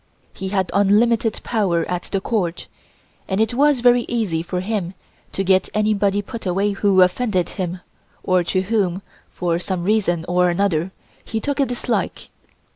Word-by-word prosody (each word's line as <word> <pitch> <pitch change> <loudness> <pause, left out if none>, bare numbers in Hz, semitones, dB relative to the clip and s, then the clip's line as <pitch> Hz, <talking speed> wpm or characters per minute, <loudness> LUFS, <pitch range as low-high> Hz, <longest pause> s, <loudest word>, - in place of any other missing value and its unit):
He 190 - -5
had 190 -2 -1
unlimited 215 +3 +2
power 185 -8 0
at 175 0 -3
the 195 - +1
Court, 190 -5 -2 0.6
and 190 +1 -1
it 220 +2 +1
was 280 0 +3
very 245 0 +5
easy 210 -9 -1
for 180 +2 -3
him 190 -2 -3 0.4
to 195 - -2
get 190 0 +2
anybody 205 -1 +1
put 230 -2 -7
away 195 +3 +1
who 195 -2 +4
offended 185 -1 0
him 180 -1 -4 0.4
or 185 -1 +2
to 185 +2 0
whom, 195 -3 0 0.3
for 170 -1 -1
some 180 -1 -3
reason 180 -5 +1
or 180 0 +3
another, 175 -1 0 0.3
he 225 - -3
took 285 +5 -3
a 275 - +3
dislike. 245 0 -3
195 Hz, 160 wpm, -21 LUFS, 180-220 Hz, 0.6 s, very